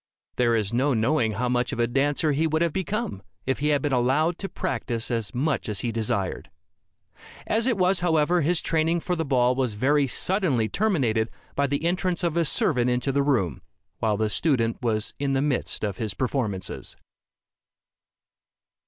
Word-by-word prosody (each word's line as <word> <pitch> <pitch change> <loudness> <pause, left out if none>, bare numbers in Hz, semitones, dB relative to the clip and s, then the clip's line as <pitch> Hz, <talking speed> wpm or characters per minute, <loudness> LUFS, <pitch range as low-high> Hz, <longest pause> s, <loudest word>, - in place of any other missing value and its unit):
There 120 -2 +3
is 105 -1 -1
no 130 +2 +2
knowing 115 0 +1
how 125 +5 -1
much 125 0 0
of - - -4
a 120 - +4
dancer 145 +5 +1
he 155 +3 +1
would 160 +1 +1
have 170 -3 0
become, 195 - -3 0.2
if 130 - -1
he 150 - 0
had 145 -1 +2
been 145 -2 0
allowed 135 +8 +2
to 195 - -4
practice 120 -2 -3
as 115 -1 -2
much 140 -1 -1
as 105 - -1
he 120 - -1
desired. 110 -4 -2 1.0
As 225 +3 +1
it 240 -5 +1
was, 185 0 +3
however, 170 0 +2
his 165 +3 +1
training 165 +1 +1
for 180 0 -1
the 165 - -1
ball 125 -4 +2
was 125 -4 -1
very 140 +5 +2
suddenly 150 - 0
terminated 125 - +1 0.2
by 140 0 +1
the 140 +4 -2
entrance 180 0 0
of 170 -2 0
a 170 -1 +2
servant 125 -3 +2
into 125 +2 0
the 140 +1 +1
room, 115 - 0 0.4
while 110 -2 +1
the 110 0 0
student 115 -7 +1
was 110 -3 -1
in 140 -1 0
the 135 - +2
midst 140 -6 -1
of 100 -3 -2
his 105 -4 -3
performances. 115 -7 -3
135 Hz, 180 wpm, -25 LUFS, 115-160 Hz, 1.0 s, a